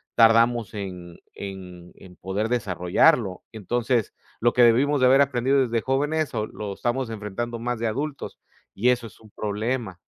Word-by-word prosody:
tardamos 115 0 +4
en 90 -4 -7 0.2
en 90 -3 -9
en 90 -2 -15
poder 100 +5 -3
desarrollarlo. 100 - +2
Entonces, 115 +2 -1 0.3
lo 120 +1 +2
que 125 - +5
debimos 135 +5 +4
de 130 - +4
haber 135 +2 +6
aprendido 135 0 +2
desde 115 -1 -1
jóvenes 145 +4 -1
o 110 -2 -2
lo 105 -2 -6
estamos 120 +4 -2
enfrentando 115 +2 -5
más 120 0 -3
de 115 - -1
adultos 140 +6 -4 0.3
y 120 +6 +1
eso 125 -1 +1
es 105 - -18
un 110 - -17
problema. 110 -1 -3
115 Hz, 160 wpm, -24 LUFS, 100-125 Hz, 0.3 s, haber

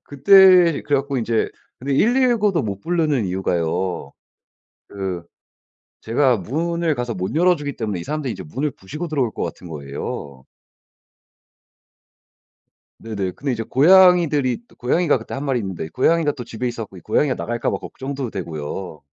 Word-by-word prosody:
그때 180 +2 +6
그래 145 - +1
갖고 140 0 -2
인제 115 -1 0 0.3
근데 135 +2 -2
119도 225 - +3
못 100 -2 -4
부르는 155 - 0
이유가요. 90 -1 -2 0.8
그 95 -3 -5 0.8
제가 125 +2 +2
문을 165 - -1
가서 120 -3 -3
못 95 +4 -4
열어 180 +2 +4
주기 145 -2 -5
때문에 105 -6 -3
이 - - -7
사람들이 150 -2 -3
이제 - - -7
문을 135 - -3
부수고 150 - -7
들어올 135 -7 0
것 - - -5
같은 90 - -7
거예요. 70 -2 -7 2.5
네네. 100 -5 -4
근데 140 +5 -3
이제 115 -2 -3
고양이들이 165 - +4
또 - - -21
고양이가 145 +3 +1
그때 110 - -8
1 135 - -4
마리 135 -3 0
있는데 95 -6 -5
고양이가 160 +3 +2
또 125 -4 -8
집에 115 +2 -5
있어 120 -2 -3
갖고 95 - -16
이 - - -10
고양이가 135 - +1
나갈까 120 0 -2
봐 - - -1
걱정도 135 -3 -6
되고요. 80 -2 -6
130 Hz, 325 characters per minute, -21 LUFS, 95-155 Hz, 2.5 s, 그때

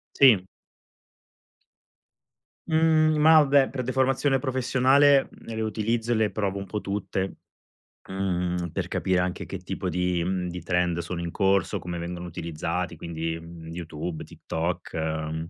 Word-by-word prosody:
Sì. 110 -9 +6 2.2
Mhmm, 160 -1 +4
ma 155 +1 +7
vabbè, 140 -1 +4
per 130 -1 -3
deformazione 130 +2 +1
professionale 130 +2 +3
le 110 -1 -7
utilizzo 110 +2 -1
e - - +4
le 110 -2 +2
provo 100 -2 -2
un 100 - -6
po' 105 +3 -3
tutte, 95 -1 -3 0.7
mhmm, 90 -2 -1
per - - -3
capire 95 -1 0
anche 90 0 -2
che - - -5
tipo - - -4
di, 90 0 0
mhmm, 90 0 -1
di 90 -1 -6
trend 90 -1 +1
sono 85 +1 -4
in 85 - -3
corso, 95 -1 +1
come 85 -1 -5
vengono 85 +1 -5
utilizzati, 80 -2 -3
quindi, 80 0 -4
mhmm, 85 0 -11
YouTube, 80 -1 -5
TikTok, 85 +2 -4
ehm, 80 0 -3
95 Hz, 140 wpm, -26 LUFS, 85-125 Hz, 2.2 s, ma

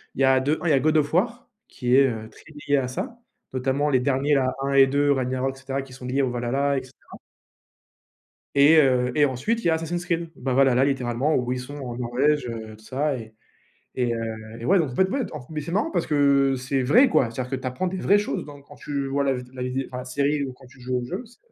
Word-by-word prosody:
il - - -3
y - - +6
a 130 0 +4
de 145 +4 0
1 175 - -2
il - - +3
y - - +5
a 135 - +4
The - - -5
God 155 +1 +3
of 145 0 0
War 235 +8 0 0.2
qui 125 0 0
est, 135 0 +6
heu, 110 -2 -6
très - - -18 0.2
lié 145 - +3
à 130 -2 -1
ça, 230 - -5 0.4
notamment 135 +3 0
les 130 -3 +2
derniers, 140 +2 +1
là, 130 -2 +2
1 140 0 -1
et 135 -1 +7
2 140 +2 +1
Ragnarok 130 0 -1
et - - -15
cetera, 135 +1 -3
qui 135 -1 -14
sont 130 -1 -10
liés 130 +2 0
au 130 - +1
Valhalla 135 +4 0
et 130 - -3
cetera. 130 - -15 1.4
Et 145 +3 +6
heu 125 -4 +3
et 150 - +5
ensuite 145 - -1
il - - -12
y - - +4
a - - +4
Assassin's 170 +2 -3
Creed, 170 -1 -1
ben, 130 0 -2
Valhalla, 135 0 +4
littéralement 135 +1 0
où 125 0 -1
ils 125 - -1
sont 125 +3 -8
en 125 -4 -6
Norvège, 125 +4 +1
heu, 110 -2 -7
tout 110 - -20
ça 140 +2 -1
et 110 -2 -10 0.6
et 125 -2 0
heu 115 - -2 0.4
et 115 - -8
ouais, 190 +8 +4
donc, 150 -5 -1
en 125 - -8
fait, 190 - +3
ouais 270 +7 -1 0.3
mais 155 -1 -3
c'est 150 - -6
marrant 215 - 0
parce - - 0
que 140 -2 +3
c'est 130 +1 -1
vrai, 245 - +5
quoi. 135 - +2
C'est-à-dire 125 +2 -5
que - - -2
tu 130 - -7
apprends 130 +9 -2
des 185 +1 -3
vraies 200 +2 +4
choses, 205 - -3
donc 145 -1 -12
quand - - -14
tu 140 -2 -4
vois 140 +1 0
la 135 -1 +1
vid 125 -1 -7
la 130 - -5
vidéo, 130 +1 -2
enfin, 125 - -7
la 125 - -6
série, 140 +3 0
ou 135 -2 -4
quand 130 +1 -17
tu 125 +1 -18
joues 125 +1 -2
au 125 - -4
jeu, 185 - -5
c'est 240 +1 -20
135 Hz, 275 wpm, -24 LUFS, 125-150 Hz, 1.4 s, et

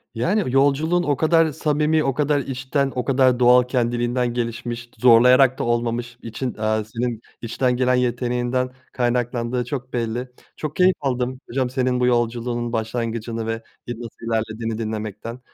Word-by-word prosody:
Yani 185 - +1
yolculuğun 145 +6 +3
o 145 -3 +1
kadar 160 +1 +3
samimi, 150 +2 +1
o 135 - 0
kadar 145 +1 +1
içten, 135 +1 -1
o 125 -2 -2
kadar 130 -2 +3
doğal 125 0 +6
kendiliğinden 120 0 0
gelişmiş, 120 0 -4
zorlayarak 125 +2 +6
da - - 0
olmamış. 120 0 -1
İçin 115 +3 -4
eee 110 0 0
senin 120 -1 -2 0.2
içten 125 +2 0
gelen 125 0 +2
yeteneğinden 125 +1 0 0.2
kaynaklandığı 120 0 -1
çok 130 0 -5
belli. 120 +1 -2 0.3
Çok 155 -1 -5
keyif 185 0 +4
aldım 130 -2 -1
hocam 130 0 -1
senin 125 -1 0
bu 125 - +2
yolculuğunun 120 0 0
başlangıcını 115 0 -3
ve, 115 0 -3 0.2
eee, 120 - -3
nasıl 115 -1 -9
ilerlediğini 110 0 -2
dinlemekten. 110 +1 -5
125 Hz, 145 wpm, -22 LUFS, 115-130 Hz, 0.3 s, doğal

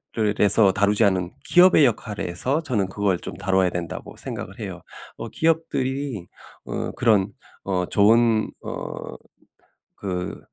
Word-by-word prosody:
를에서 105 -2 +4
다루자 100 +1 +3
않은 90 -2 -1
'기업의 175 0 +6
역할에서 110 - -1
저는 110 -10 0
그걸 95 -2 0
좀 - - -7
다뤄야 95 -1 +2
된다.'고 85 -2 -6
생각을 - - -7
해요. - - -6 0.4
어 115 - -6
기업들이 140 - -1 0.4
어 - - -4
그런 105 -5 +2 0.3
어 90 -2 -1
좋은 110 +1 +3
어 - - -6 0.8
그 90 -2 -4
105 Hz, 250 characters per minute, -23 LUFS, 95-125 Hz, 0.8 s, 기업의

